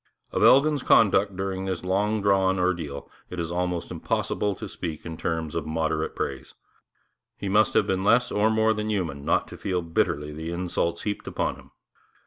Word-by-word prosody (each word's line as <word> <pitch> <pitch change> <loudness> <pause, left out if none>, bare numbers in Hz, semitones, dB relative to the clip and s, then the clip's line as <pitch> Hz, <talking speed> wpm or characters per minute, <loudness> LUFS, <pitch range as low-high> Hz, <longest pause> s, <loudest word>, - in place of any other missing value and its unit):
Of - - -1
Elgin's 145 +1 +5
conduct 100 -4 +4
during 95 0 -3
this 95 -2 -3
long 100 +3 0
drawn 95 -1 +3
ordeal 85 -6 -2 0.2
it 90 - -6
is 85 0 -3
almost 90 -1 -2
impossible 105 -1 -1
to - - -7
speak 80 -3 -6
in 80 -1 -5
terms 80 -1 -3
of 85 - -3
moderate 80 0 -1
praise. 65 -2 -4 0.8
He - - -5
must 105 +2 +3
have - - +4
been 95 0 -1
less 120 +4 +3
or 105 +1 +3
more 110 0 +3
than 105 0 -3
human 85 -9 -2
not - - +1
to - - -10
feel 90 -3 -1
bitterly 75 -2 -1
the 80 +2 -5
insults 85 -1 -2
heaped 105 -1 -3
upon - - -2
him. - - -17
95 Hz, 180 wpm, -26 LUFS, 85-105 Hz, 0.8 s, Elgin's